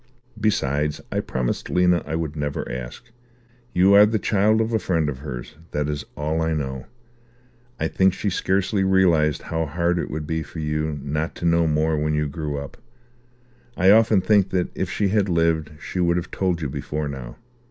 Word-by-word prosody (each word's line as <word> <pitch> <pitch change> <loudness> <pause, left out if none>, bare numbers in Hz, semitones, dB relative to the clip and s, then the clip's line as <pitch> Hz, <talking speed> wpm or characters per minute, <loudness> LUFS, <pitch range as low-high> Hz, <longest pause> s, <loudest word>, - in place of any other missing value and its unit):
Besides, 75 -8 0
I - - 0
promised 60 -2 -2
Lena 90 -1 +3
I 80 - -2
would 80 -2 -3
never 75 -1 -3
ask. 60 - -6 0.7
You 95 +2 +4
are 105 +1 +8
the 110 +1 +1
child 105 +2 +2
of 110 +1 0
a 110 - +2
friend 85 -6 0
of 65 -3 -5
hers. 65 -2 -7 0.2
That 75 0 0
is 75 -2 -3
all 80 +2 -1
I 80 0 0
know. 65 -3 -4 0.9
I - - +1
think 95 0 +3
she 100 +2 -2
scarcely 95 +2 0
realized 85 -6 +3
how 80 -1 -2
hard 85 +3 0
it - - -3
would 75 -1 -4
be 80 +1 -2
for 80 - -10
you 75 -1 -2
not 75 +3 -2
to - - -5
know 85 0 +3
more 80 0 +1
when 75 0 0
you 75 0 0
grew 75 0 -4
up. 70 0 -7 1.0
I 95 +2 +5
often 110 -2 +5
think 100 -1 +3
that 90 -2 0
if 95 - -3
she 100 0 0
had 100 -1 +1
lived 80 -2 +1
she 90 - -5
would 85 -1 +2
have 90 0 -4
told 90 -4 -1
you 70 - -2
before 75 +2 -3
now." 65 -4 -7
80 Hz, 195 wpm, -23 LUFS, 75-95 Hz, 1.0 s, are